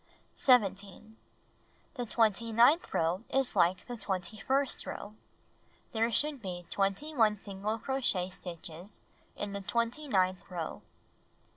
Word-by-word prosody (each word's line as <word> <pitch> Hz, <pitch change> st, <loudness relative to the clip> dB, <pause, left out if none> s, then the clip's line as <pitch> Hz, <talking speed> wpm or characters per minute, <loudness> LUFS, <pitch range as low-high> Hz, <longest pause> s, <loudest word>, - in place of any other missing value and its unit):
17. 205 Hz, -3 st, +2 dB, 0.8 s
The 245 Hz, -3 st, -4 dB
twenty 225 Hz, 0 st, +2 dB
ninth 240 Hz, +10 st, +5 dB
row 170 Hz, +4 st, +1 dB
is 270 Hz, -3 st, +1 dB
like 185 Hz, 0 st, +3 dB
the 245 Hz, -, -5 dB
twenty 190 Hz, -1 st, -3 dB
first 270 Hz, +4 st, 0 dB
row. 205 Hz, -, -6 dB, 0.8 s
There 225 Hz, +1 st, +1 dB
should 290 Hz, +2 st, 0 dB
be 180 Hz, -3 st, -6 dB
21 210 Hz, +2 st, +1 dB
single 205 Hz, +2 st, -3 dB
crochet 225 Hz, -7 st, 0 dB
stitches 175 Hz, +1 st, -8 dB, 0.3 s
in 205 Hz, -1 st, -4 dB
the 200 Hz, -, -3 dB
twenty 235 Hz, +8 st, -1 dB
ninth 185 Hz, -6 st, +1 dB
row. 170 Hz, -4 st, -5 dB
210 Hz, 120 wpm, -31 LUFS, 185-240 Hz, 0.8 s, ninth